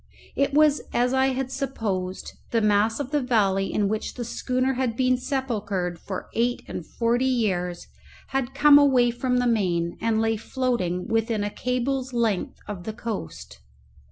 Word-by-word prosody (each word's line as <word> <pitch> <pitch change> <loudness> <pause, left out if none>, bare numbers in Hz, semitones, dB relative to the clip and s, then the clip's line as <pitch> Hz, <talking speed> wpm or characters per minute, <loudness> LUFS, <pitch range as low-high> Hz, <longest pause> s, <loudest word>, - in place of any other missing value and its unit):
It 280 0 +1
was 300 -1 +5
as 245 +1 +2
I 265 0 +3
had 265 0 -2
supposed: 215 -9 -3 0.2
the 230 - +2
mass 210 +2 +2
of 280 -1 -4
the 295 -1 +1
valley 200 -6 +1
in 205 -1 +1
which 215 +1 -3
the 240 - -4
schooner 255 +2 -1
had 250 -3 -1
been 255 -1 +3
sepulchred 210 -10 -2
for 190 +1 -6
eight 240 +2 0
and - - -5
forty 240 +7 0
years 185 -8 -1 0.4
had 270 -1 -2
come 290 0 +7
away 255 -4 +4
from 250 +1 -1
the 245 - +1
main, 180 -7 0
and 225 -1 +1
lay 225 0 +1
floating 210 -8 -1
within 225 -1 0
a 205 - -2
cable's 255 +2 -2
length 225 -5 0
of 190 -4 -6
the 220 - -4
coast. 210 - -6
235 Hz, 165 wpm, -25 LUFS, 205-260 Hz, 0.4 s, come